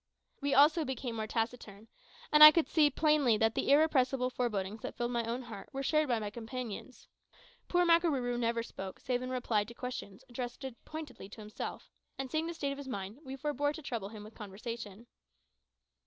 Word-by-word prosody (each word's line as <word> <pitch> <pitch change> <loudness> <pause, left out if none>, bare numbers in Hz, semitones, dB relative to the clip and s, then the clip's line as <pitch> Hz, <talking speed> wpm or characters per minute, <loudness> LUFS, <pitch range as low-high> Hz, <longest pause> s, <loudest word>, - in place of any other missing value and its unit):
We 280 0 +1
also 305 +4 +6
became 255 -3 -4
more 220 0 -2
taciturn, 225 -2 -4 0.4
and 300 0 +9
I 305 - +15
could 320 +1 +2
see 300 -3 +4
plainly 290 -5 +3
that 225 +1 +2
the - - -1
irrepressible 270 -4 +3
forebodings 215 -4 -2
that - - -6
filled 240 0 -1
my 235 -1 0
own 240 +3 -3
heart, 225 -4 -9
were 270 0 -3
shared 305 +2 +2
by 240 -3 +1
my 210 -2 -4
companions. 240 +1 -7 0.6
Poor 355 0 +3
Makarooroo 295 -8 +2
never 230 -1 0
spoke, 195 -4 -8
save 250 -1 -1
in 255 - -4
reply 245 -4 0
to 235 +3 -12
questions 250 -3 -6
addressed 245 +1 -6 0.2
pointedly 310 -10 -8
to 215 - -11
himself; 210 0 -7 0.3
and 270 -2 -5
seeing 315 +1 0
the 340 - -5
state 280 -3 -2
of 275 - -6
his 280 - -8
mind, 205 -1 -5
we 265 -1 -6
forbore 290 +1 -1
to 315 - -8
trouble 225 -7 -4
him 215 -1 -9
with 215 +1 -12
conversation. 215 +1 -7
250 Hz, 190 wpm, -32 LUFS, 225-285 Hz, 0.6 s, I